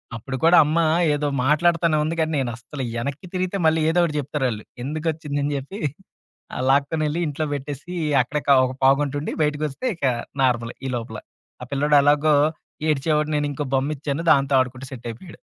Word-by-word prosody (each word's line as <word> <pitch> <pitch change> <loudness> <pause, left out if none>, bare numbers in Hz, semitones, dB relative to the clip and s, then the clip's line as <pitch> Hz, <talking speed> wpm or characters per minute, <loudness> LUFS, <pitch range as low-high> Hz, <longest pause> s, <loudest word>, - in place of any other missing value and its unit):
అప్పుడు 130 +4 -5
కూడా 170 +2 +6
అమ్మ 155 +3 0 0.4
ఏదో 145 0 -1 0.2
మాట్లాడుతానే 165 +1 +3
ఉంది 160 +2 -2
కానీ 160 0 +1
నేను 130 -3 -1
అస్సలు 130 +3 -7 0.2
ఎనక్కి 140 +7 -5
తిరిగితే 185 +1 -1
మళ్ళీ 160 0 +3
ఏదో 175 +2 +2
ఒకటి 160 -3 -1
చెప్తారాళ్ళు. 130 -6 -2 0.2
ఎందుకొచ్చిందని 150 -1 -2
చెప్పి, 140 +10 -7 0.8
ఆహ్, 130 - -2
లాక్కొనెళ్ళి 150 +3 +1
ఇంట్లో 150 +1 -2
పెట్టేసి 145 +5 -7 0.3
అక్కడే 150 +4 -3
కా 140 - +7
ఒక 130 0 -4
పావుగంటంటుండి 145 +2 +2
బయటికొస్తే 150 - -2
ఇక 160 - -3 0.4
నార్మలే 120 -2 0
ఈ - - -3
లోపల. 110 -2 -6 0.4
ఆ - - -5
పిల్లోడు 145 +1 +3
ఎలాగో 150 +1 +4 0.5
ఏడ్చేవాడు 150 +1 +1
నేనింకో 145 0 -1
బొమ్మిచ్చాను 140 +2 -2
దాంతో 140 0 +3
ఆడుకుంటూ 130 +1 -2
సెట్టయిపోయాడు. 120 +6 -9
145 Hz, 150 wpm, -23 LUFS, 135-155 Hz, 0.8 s, కా